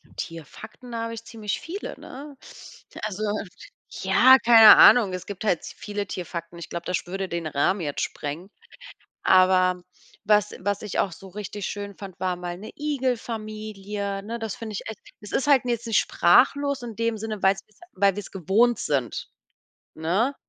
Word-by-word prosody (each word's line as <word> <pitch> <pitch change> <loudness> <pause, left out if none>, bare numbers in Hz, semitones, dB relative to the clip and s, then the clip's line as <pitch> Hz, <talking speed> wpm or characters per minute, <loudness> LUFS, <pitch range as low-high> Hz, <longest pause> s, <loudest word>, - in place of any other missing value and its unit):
Tierfakten, 215 - -9
habe 230 0 -3
ich 230 - -8
ziemlich 215 -3 -4
viele, 380 +5 -7
ne? 280 +1 -10 0.7
Also, 215 0 -3 0.8
ja, 260 +1 +7
keine 225 -2 +10
Ahnung. 215 -7 +7
Es 180 - -5
gibt 200 -1 -7
halt 180 -6 +1
zu - - -9
viele 205 -1 -4
Tierfakten. 170 -2 -6
Ich 170 - -8
glaube, 170 0 -6
das 180 - 0
sch - - -9
würde 190 +1 -4
den 170 -2 -3
Rahmen 155 +7 0
jetzt 145 -3 -3
sprengen. 160 +6 -5 0.7
Aber 185 -1 +4 0.4
was 210 0 +3
was 205 +2 -2
ich 210 -3 -4
auch 195 - +1
so 190 +3 -12
richtig 205 +1 -6
schön 200 -1 -6
fand, 195 -2 -10
war 185 -1 -1
mal 175 0 -6
'ne 210 +4 -10
Igelfamilie, 215 -7 -3
ne? 230 +3 -5
Das 225 -3 -4
finde 220 -2 -7
ich 200 - -4
echt 220 - -8 0.2
es 210 - -10
ist 275 - 0
halt 275 -3 +5
jetzt 235 -1 -2
nicht 225 - +3
sprachlos 280 -1 +3
in 230 -2 -7
dem 230 0 -1
Sinne, 215 -1 -5
weil 195 +1 +5
es - - -9 0.3
weil 195 0 +2
wir 205 - -4
es 195 - -13
gewohnt 210 +6 +2
sind, 135 -5 -2 0.7
ne? 190 - 0
205 Hz, 175 wpm, -25 LUFS, 185-230 Hz, 0.8 s, keine